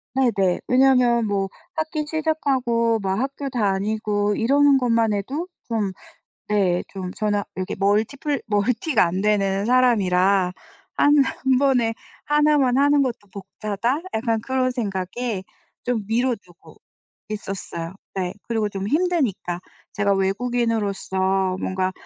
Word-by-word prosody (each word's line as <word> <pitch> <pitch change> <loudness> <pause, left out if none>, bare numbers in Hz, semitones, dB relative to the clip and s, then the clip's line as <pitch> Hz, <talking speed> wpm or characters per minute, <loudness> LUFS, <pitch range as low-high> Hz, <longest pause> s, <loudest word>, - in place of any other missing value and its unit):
네네. 200 -9 +2
왜냐면 250 -2 +4
뭐 200 -2 -1 0.3
학기 315 -1 -2
시작하고 265 -8 +1
막 195 0 -1
학교 275 +2 -3
다니고 210 -2 0
이러는 280 +5 +4
것만 230 -4 +2
해도 270 - -3 0.2
좀 220 -4 -1 0.6
네 190 -4 +2
좀 185 -2 -6
저는 205 -1 0 0.2
여기 185 - -3
멀티 210 +6 +1
플 285 0 -2
멀티가 225 - +2
안 180 +2 -1
되는 200 -1 +1
사람이라' 195 -7 +3 0.4
1- 290 - +5 0.3
1 260 -1 +4
번에 255 -5 +2 0.3
1만 295 -4 +3
하는 285 0 +4
것도 235 -6 -3
벅차다.' 210 +6 -3
약간 225 0 0
그런 255 +2 0
생각에 205 -1 -3 0.4
좀 240 -4 -1
미뤄두고 225 -6 -3 0.5
있었어요. 195 -5 -5 0.2
네 185 -2 -2 0.2
그리고 220 -2 0
좀 195 0 -4
힘드니까. 280 - 0 0.3
제가 200 -1 +1
외국인으로서 195 -3 0
뭔가 185 0 -1
220 Hz, 245 characters per minute, -23 LUFS, 195-255 Hz, 0.6 s, 1